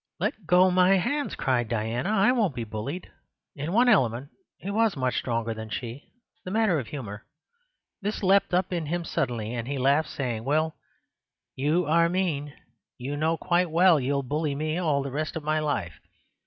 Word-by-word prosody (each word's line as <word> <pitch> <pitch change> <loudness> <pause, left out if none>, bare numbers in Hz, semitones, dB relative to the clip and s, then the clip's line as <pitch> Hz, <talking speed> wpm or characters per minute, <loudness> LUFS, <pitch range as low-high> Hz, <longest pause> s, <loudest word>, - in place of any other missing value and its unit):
"Let 185 - -3
go 180 +1 +5
my 185 +1 +5
hands!" 285 +11 -1
cried 120 -4 0
Diana. 115 - -1
"I 215 +2 +4
won't 215 - +1
be 120 - -3
bullied." 115 +11 -6 0.4
In 150 +2 -4
one 240 +5 +4
element 130 - +2 0.3
he 195 - -5
was 220 -4 +2
much 130 -1 0
stronger 115 -2 -2
than 110 0 -7
she—the 130 - -8
matter 205 -5 +2
of 125 - -6
humour. 110 -6 -7 0.8
This 205 +1 -3
leapt 195 +1 +4
up 180 +1 +1
in 165 -3 -2
him 170 +2 -2
suddenly, 120 -9 -2
and 120 -1 -4
he 140 +1 -2
laughed, 140 +4 +2
saying: 120 -5 -3
"Well, 155 +4 0 0.8
you 155 +6 +1
are 170 +2 +3
mean. 165 -6 -1 0.5
You 135 +3 -4
know 160 +3 +1
quite 175 0 +1
well 170 0 +5
you'll 140 +1 0
bully 145 +2 -1
me 155 +3 -2
all 150 -6 +1
the 140 - -5
rest 155 +3 -3
of 160 - -4
my 155 +1 +1
life. 140 - -2
155 Hz, 180 wpm, -26 LUFS, 130-180 Hz, 0.8 s, go